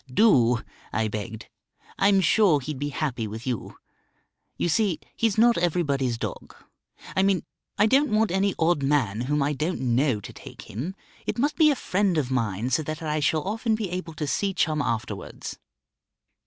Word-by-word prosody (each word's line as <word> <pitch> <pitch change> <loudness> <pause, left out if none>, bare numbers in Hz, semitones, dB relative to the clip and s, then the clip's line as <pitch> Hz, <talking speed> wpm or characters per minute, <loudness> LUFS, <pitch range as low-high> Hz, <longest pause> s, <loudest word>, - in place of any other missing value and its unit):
"Do," 125 - +4 0.3
I 110 +1 0
begged, 110 +1 -6 0.5
"I'm 195 0 +4
sure 185 -3 +4
he'd 140 0 -5
be 145 +1 -2
happy 125 -6 -2
with 110 +3 -7
you. 125 -5 -4 0.8
You - - 0
see, 190 0 +1 0.2
he's 225 -3 +1
not 235 -1 +5
everybody's 145 -8 0
dog; - - -6 0.6
I 190 - +3
mean 195 -1 +2 0.3
I 210 - +5
don't 270 +6 +4
want 215 -2 +2
any 190 +1 +1
odd 165 -2 +2
man 135 -7 +1
whom 145 +3 0
I 145 +2 0
don't 155 +6 -2
know 125 -1 +1
to 105 - -10
take - - -11
him. 145 - -5 0.3
It - - -1
must 285 +5 +1
be 315 -2 +5
a 290 - +3
friend 195 -6 0
of 135 -4 0
mine, 115 -1 -1
so 130 - +2
that 155 +2 -5
I 155 0 -1
shall 150 +1 +1
often 220 +3 0
be 210 -5 -4
able 170 -3 -5
to 150 - -3
see 195 +6 -1
Chum 155 -4 +1
afterwards." 115 -5 -4
155 Hz, 180 wpm, -25 LUFS, 130-195 Hz, 0.8 s, not